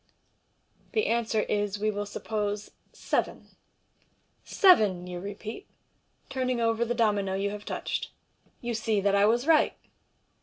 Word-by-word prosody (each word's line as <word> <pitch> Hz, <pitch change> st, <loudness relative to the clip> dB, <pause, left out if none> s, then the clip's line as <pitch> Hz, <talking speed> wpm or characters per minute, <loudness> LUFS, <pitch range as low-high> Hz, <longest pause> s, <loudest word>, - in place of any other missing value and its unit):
The 435 Hz, -, +2 dB
answer 230 Hz, -2 st, +1 dB
is, 205 Hz, -1 st, -1 dB
we 215 Hz, +1 st, 0 dB
will 205 Hz, 0 st, -3 dB
siippose, 210 Hz, 0 st, -3 dB, 0.2 s
" -, -, -38 dB
Seven." -, -, -2 dB, 0.5 s
" -, -, -41 dB, 0.2 s
Seven," 210 Hz, -, +6 dB
you 180 Hz, -1 st, -6 dB
repeat, 205 Hz, -, -7 dB, 0.6 s
turning 255 Hz, -2 st, -1 dB
over 230 Hz, 0 st, +1 dB
the 240 Hz, +1 st, -1 dB
domino 205 Hz, -4 st, +1 dB
you 200 Hz, +1 st, -1 dB
have 210 Hz, 0 st, -7 dB
touch -, -, -3 dB
td. -, -, -5 dB, 0.3 s
" -, -, -37 dB
You 240 Hz, 0 st, -3 dB
see 220 Hz, -1 st, 0 dB
that 200 Hz, 0 st, +1 dB
I 200 Hz, +1 st, +5 dB
was 240 Hz, +4 st, +2 dB
right. 320 Hz, -1 st, +4 dB
215 Hz, 155 wpm, -28 LUFS, 205-235 Hz, 0.6 s, Seven